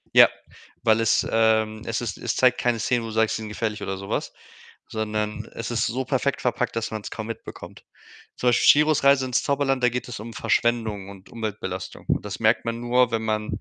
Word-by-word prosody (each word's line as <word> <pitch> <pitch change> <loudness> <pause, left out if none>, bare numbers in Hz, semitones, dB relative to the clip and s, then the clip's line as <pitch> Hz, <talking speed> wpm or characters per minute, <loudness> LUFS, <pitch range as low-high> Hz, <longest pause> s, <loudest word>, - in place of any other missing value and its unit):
Ja, - - +10 0.6
weil 110 -1 +4
es, 115 -1 +2
ähm, 110 -1 +2
es 115 +1 -2
ist 115 -6 -4
es - - -2
zeigt 125 -1 +4
keine 120 -2 +1
Szene, 120 +2 +1
wo - - -5
du - - -6
sagst, 110 0 +2
sind 110 -1 -6
gefährlich 105 0 -3
oder 95 -1 -3
so 100 +1 -8
was, - - -2 0.5
sondern 105 0 -3
es 115 - -5
ist 120 -2 0
so 130 +4 -2
perfekt 140 +1 0
verpackt, 125 -1 -1
dass 115 0 -2
man's 110 -2 -5
kaum 110 -1 -5
mitbekommt. 115 - -9 0.5
Zum 125 - +1
Beispiel 120 - +3
Chihiros 150 -1 +5
Reise 140 -1 +5
ins 125 -1 +1
Zauberland, 135 -2 0
da - - +6
geht 125 +1 -4
es 120 - -6
um 115 +3 -8
Verschwendung 110 -5 0
und 100 -1 -13
Umweltbelastung 100 -4 -5
und - - 0
das - - -6
merkt - - +3
man 115 0 -3
nur, 120 +1 +3
wenn 115 -1 0
man 110 -1 -1
115 Hz, 210 wpm, -24 LUFS, 110-125 Hz, 0.6 s, Ja